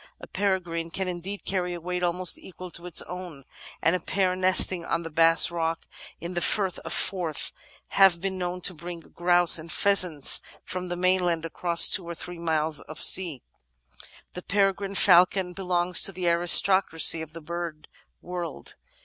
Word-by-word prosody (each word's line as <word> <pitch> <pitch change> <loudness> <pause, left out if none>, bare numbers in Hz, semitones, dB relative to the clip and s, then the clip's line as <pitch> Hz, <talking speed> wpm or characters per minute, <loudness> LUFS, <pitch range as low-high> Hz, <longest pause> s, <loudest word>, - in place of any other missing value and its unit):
A - - -11
peregrine 180 -4 -4
can 190 +3 -5
indeed 180 +3 -7
carry 180 -2 -3
a - - -9
weight 180 +1 -6
almost 180 +1 0
equal 185 -1 -12
to 170 +2 -10
its 175 - 0
own, 180 -6 -10 0.4
and 165 - +2
a - - -3
pair 185 +1 -2
nesting 185 -1 +3
on 165 +1 -4
the 165 - -9
Bass 165 +2 +4
Rock, 165 -1 -4 0.3
in 170 +2 -8
the 175 - -4
Firth 190 -2 -1
of - - -10
Forth, 175 -6 -3 0.4
have 190 -3 +3
been 190 +1 -5
known 180 0 -5
to 180 - 0
bring 170 +1 -9
grouse 175 0 +2
and 160 +1 -11
pheasants 180 -8 +3 0.2
from 180 0 -7
the 175 - -5
mainland 180 -2 -1
across 170 +1 +4
two 190 - +1
or 170 - -7
three 175 +1 -10
miles 160 -2 -2
of 155 - -11
sea. 170 -9 +3 0.9
The 180 - -8
Peregrine 200 0 -2
Falcon 180 0 +3
belongs 180 -1 +1
to - - -2
the 180 -2 -5
aristocracy 170 -1 +5
of 160 -1 -11
the 165 - -11
bird 170 -1 -8 0.4
world. 175 -2 -8
175 Hz, 170 wpm, -24 LUFS, 165-185 Hz, 0.9 s, aristocracy